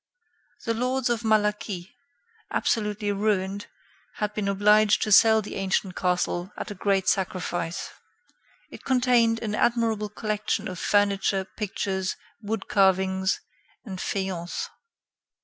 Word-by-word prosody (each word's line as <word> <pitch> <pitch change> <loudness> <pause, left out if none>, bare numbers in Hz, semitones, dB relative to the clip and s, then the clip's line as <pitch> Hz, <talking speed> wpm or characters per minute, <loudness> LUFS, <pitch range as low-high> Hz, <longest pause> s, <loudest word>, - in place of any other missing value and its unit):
The 230 - +1
lords 250 +1 0
of 235 -1 0
Malaquis, 210 -4 0 0.6
absolutely 210 -1 0
ruined, 200 -1 -1 0.5
had 210 -1 -2
been 210 -2 -2
obliged 210 +1 +4
to 215 - -2
sell 220 +1 +6
the - - -6
ancient 190 -1 -1
castle 180 0 -1
at - - -5
a - - -3
great 195 -1 0
sacrifice. 175 -2 -1 0.8
It - - -11
contained 245 -3 +3
an 210 -2 -2
admirable 225 -2 +1
collection 215 -1 -2
of 180 -2 -6
furniture, 200 -1 +2
pictures, 190 -2 -3 0.3
wood 220 +1 -4
carvings, 190 -1 +2 0.4
and 190 -4 -6
faience. 185 -3 -3
205 Hz, 115 wpm, -26 LUFS, 190-215 Hz, 0.8 s, sell